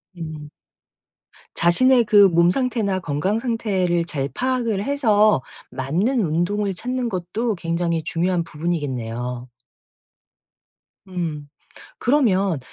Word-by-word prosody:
음. 155 -3 -7 1.1
자신의 240 +8 +4
그 205 -2 +6
몸 170 0 +4
상태나 220 -5 0
건강 170 +7 -1
상태를 195 -8 0
잘 140 -5 -2
파악을 240 - -1
해서 215 - +3 0.3
맞는 175 - 0
운동을 190 +4 0
찾는 250 +5 -3
것도 205 +5 -2
굉장히 170 -1 -2
중요한 175 +1 0
부분이겠네요. 125 -7 -4 1.6
음. 160 -6 -5 0.5
그러면 200 - +2
180 Hz, 210 characters per minute, -22 LUFS, 165-220 Hz, 1.6 s, 그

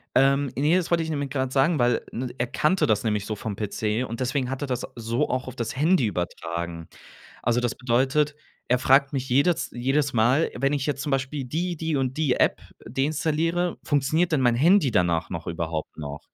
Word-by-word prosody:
Ähm, 135 0 +3
ne, 150 +6 +3
das 175 -1 -2
wollte 170 -1 +3
ich 160 - -5
nämlich 145 -3 -3
grad 130 -2 -1
sagen, 140 +3 +2
weil, 120 -1 +2
ne, 125 +1 -4
er 120 - 0
kannte 155 +9 +1
das 110 0 +1
nämlich 105 -2 -1
so 110 - -3
vom 105 -1 -5
PC 105 +3 -2
und 115 +1 -6
deswegen 130 0 -1
hat 135 - -4
er 145 - -2
das 125 -2 -2
so 115 +5 -1
auch 130 0 -2
auf 130 - -7
das 115 +1 -4
Handy 155 -1 +3
übertragen. 85 -3 -4 0.6
Also, 120 +1 +2
das 120 -2 -1
bedeutet, 135 +4 +1 0.3
er 125 0 +3
fragt 135 +2 +4
mich 135 -1 -3
jedes 140 +7 +2
jedes 135 +3 0
Mal, 120 +8 +3
wenn 140 +3 +1
ich 140 -1 -1
jetzt 140 -1 -2
zum 145 - -3
Beispiel 135 +1 -1
die, 170 +6 -2
die 160 -1 -1
und 130 0 -1
die 150 -5 +2
App - - +2 0.3
deinstalliere, 160 +6 0
funktioniert 155 +4 +1
dann 145 - +3
mein 120 -2 +3
Handy 165 +2 +4
danach 85 -4 +1
noch 85 -3 -6
überhaupt 80 -2 -4
noch? 75 -1 -6
130 Hz, 205 wpm, -25 LUFS, 115-150 Hz, 0.6 s, fragt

